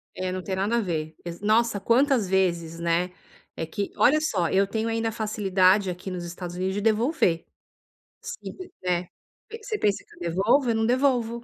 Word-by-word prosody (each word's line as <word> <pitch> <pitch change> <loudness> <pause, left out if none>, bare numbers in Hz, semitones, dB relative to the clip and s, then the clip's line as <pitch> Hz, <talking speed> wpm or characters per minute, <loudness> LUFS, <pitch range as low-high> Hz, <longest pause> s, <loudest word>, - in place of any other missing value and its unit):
É, 185 0 -2
não 185 0 -4
tem 190 - -3
nada 200 +5 +1
a - - +3
ver, 160 -5 -3
exa 170 +3 -7
nossa, 225 0 +3
quantas 240 +1 +3
vezes, 170 -3 0
né. 170 +2 0 0.4
É 165 - -3
que 200 +5 -4
olha 305 +4 +5
só, 185 - 0
eu 195 +1 +3
tenho 220 +2 -2
ainda 225 0 0
a - - -5
facilidade 195 -3 +2
aqui 180 +2 -5
nos 180 -1 -4
Estados 175 0 -7
Unidos 185 +1 -2
de 205 - -1
devolver, 220 - +2 0.8
se 470 +1 -6
quiser. 180 - -4 0.4
Pen 455 +1 -8
você 435 -2 -2
pensa 205 -1 +1
que - - -20
eu - - -19
devolvo? 235 - +3
Eu 230 - +2
não 225 0 +1
devolvo. 240 -2 +1
200 Hz, 195 wpm, -25 LUFS, 180-235 Hz, 0.8 s, olha